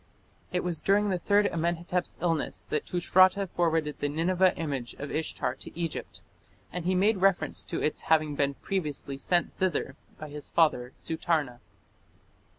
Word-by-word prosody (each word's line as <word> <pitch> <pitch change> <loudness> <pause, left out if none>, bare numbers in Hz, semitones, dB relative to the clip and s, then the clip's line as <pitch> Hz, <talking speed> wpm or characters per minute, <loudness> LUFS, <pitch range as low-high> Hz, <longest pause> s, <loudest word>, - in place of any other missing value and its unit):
It 180 - 0
was 175 -3 -2
during 205 +1 +3
the 180 - 0
third 205 +3 +3
Amenhotep's 170 0 -1
illness 165 -3 -1
that 150 - -1
Tushratta 185 +2 +4
forwarded 165 -4 0
the 145 - 0
Nineveh 180 +4 +2
image 140 -7 -3
of 145 0 -6
Ishtar 155 -5 -1
to 135 - -11
Egypt, 165 -2 -4 0.5
and 180 -1 -4
he 185 +1 +2
made 200 +3 +3
reference 195 0 +2
to - - -3
its 150 - 0
having 155 -2 +3
been 140 -1 0
previously 150 -7 -3
sent 175 +4 +1
thither 185 -5 0 0.2
by 155 - -8
his 145 0 -7
father, 135 -7 +2
Sutarna. 155 -6 -1
165 Hz, 155 wpm, -28 LUFS, 150-180 Hz, 0.5 s, Tushratta